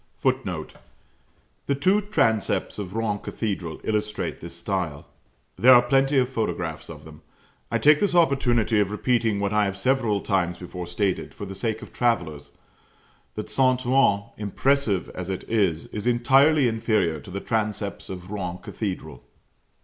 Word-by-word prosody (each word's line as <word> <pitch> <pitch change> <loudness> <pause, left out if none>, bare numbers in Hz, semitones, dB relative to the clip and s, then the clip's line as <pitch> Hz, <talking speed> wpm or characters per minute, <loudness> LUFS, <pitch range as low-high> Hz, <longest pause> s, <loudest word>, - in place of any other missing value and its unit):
[Footnote: - - -2 0.9
The 140 - +1
two 190 +9 +3
transepts 115 - 0
of 95 -1 -6
Rouen 110 -2 -1
Cathedral 95 -9 -4
illustrate 105 -1 -2
this - - -7
style. 90 -7 -3 0.5
There 130 +1 +8
are 120 - +7
plenty 135 +2 +2
of 125 -1 +3
photographs 115 -4 -3
of - - -10
them. - - -13 0.5
I - - +1
take 150 0 +5
this 200 -3 +1
opportunity 120 -9 +3
of 100 -2 +2
repeating 110 -1 0
what 100 0 -1
I 105 -1 +3
have 95 -1 -3
several 115 -2 +1
times 90 -4 0
before 90 -1 -7
stated, 95 +2 -2
for 100 - -6
the 95 - -7
sake 110 +3 -3
of - - -12
travellers, 85 -12 -1 0.9
that - - -6
St. 130 -1 +2
Ouen, 125 -6 +3
impressive 105 0 0
as 90 0 -6
it 95 - -3
is, 95 -8 +1
is 105 +2 -3
entirely 135 +4 +4
inferior 110 -8 0
to - - -13
the 95 +2 -4
transepts 105 -2 -3
of 90 0 -8
Rouen 90 -4 -4
Cathedral. 80 - -6
105 Hz, 155 wpm, -24 LUFS, 95-125 Hz, 0.9 s, There